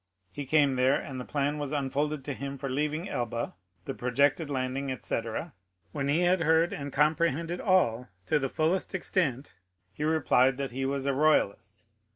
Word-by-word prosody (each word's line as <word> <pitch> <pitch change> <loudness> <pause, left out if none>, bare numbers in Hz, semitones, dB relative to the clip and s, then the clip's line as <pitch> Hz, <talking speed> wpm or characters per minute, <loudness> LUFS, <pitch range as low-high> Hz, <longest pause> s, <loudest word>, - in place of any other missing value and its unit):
He 145 -2 -6
came 140 -3 +3
there, 130 +2 +3
and 130 -2 -6
the - - -7
plan 145 +1 -1
was 145 -1 -3
unfolded 145 0 -1
to 145 - -3
him 140 +1 -5
for 135 - -4
leaving 150 +6 -1
Elba, 120 - -3 0.3
the - - -3
projected 140 +5 +1
landing, 130 0 -2
etc. 130 +4 -3 0.4
When 135 +6 -2
he 150 +5 +2
had 180 0 +3
heard 160 +2 +3
and 140 0 -5
comprehended 160 +3 +1
all 125 - +2 0.2
to 155 - +2
the 135 -1 -1
fullest 165 +7 0
extent, 150 -8 -1 0.4
he 150 - -5
replied 135 -5 +3
that 140 -2 -3
he 135 +2 -3
was 140 0 -2
a 140 - +1
royalist. 110 -9 +1
140 Hz, 175 wpm, -29 LUFS, 130-155 Hz, 0.4 s, came